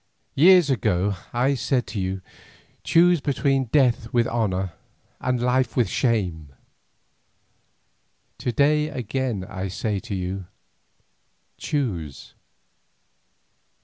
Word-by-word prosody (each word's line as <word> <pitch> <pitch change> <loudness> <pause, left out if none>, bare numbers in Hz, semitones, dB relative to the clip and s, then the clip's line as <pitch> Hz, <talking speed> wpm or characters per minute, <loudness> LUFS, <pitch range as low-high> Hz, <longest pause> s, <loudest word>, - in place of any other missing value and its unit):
Years 175 0 +6
ago 100 -5 +1 0.2
I 125 +4 +1
said 125 0 0
to 105 - -2
you, 95 0 -3 0.6
Choose 175 -1 +4
between 135 -1 +1
death 120 -3 +2
with 120 -1 +2
honour 95 -7 -1 0.5
and 130 -1 -1
life 125 +1 +1
with 120 - +3
shame! 90 - -1 1.9
To 125 - -1
day 150 +4 +2
again 125 -6 -3
I 95 -1 -4
say 105 +2 -2
to 105 -1 -6
you, 95 0 -4 1.1
Choose! 90 - -3
120 Hz, 100 wpm, -24 LUFS, 95-135 Hz, 1.9 s, Years